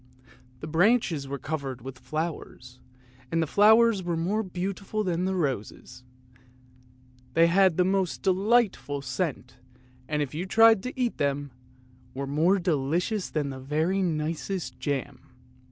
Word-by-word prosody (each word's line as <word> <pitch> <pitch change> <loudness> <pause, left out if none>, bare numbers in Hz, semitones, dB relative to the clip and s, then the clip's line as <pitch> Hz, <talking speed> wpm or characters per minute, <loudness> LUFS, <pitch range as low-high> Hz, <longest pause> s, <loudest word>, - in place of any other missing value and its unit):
The 155 - -6
branches 170 - +2
were 140 +1 -4
covered 135 -4 -5
with 130 0 -8
flowers, 155 -6 -6 0.5
and 165 - +1
the 165 - +2
flowers 220 +4 +5
were 175 -2 -2
more 190 +7 0
beautiful 195 +2 -4
than 180 0 -1
roses; 135 - -3 1.3
they 165 - +6
had 185 0 +3
the 180 - +4
most 190 -2 -1
delightful 195 - +1
scent, 130 -3 -4 0.5
and, 150 -1 0
if 140 - -7
you 175 +5 -4
tried 225 0 +6
to 255 +4 -7
eat 245 -2 0
them, 140 0 -1 0.6
were 140 +1 -3
more 160 +8 +2
delicious 175 +4 -1
than 145 -3 -2
the 130 - -7
very 155 +8 0
nicest 165 +2 -3
jam. 140 -3 -3
165 Hz, 135 wpm, -27 LUFS, 145-195 Hz, 1.3 s, they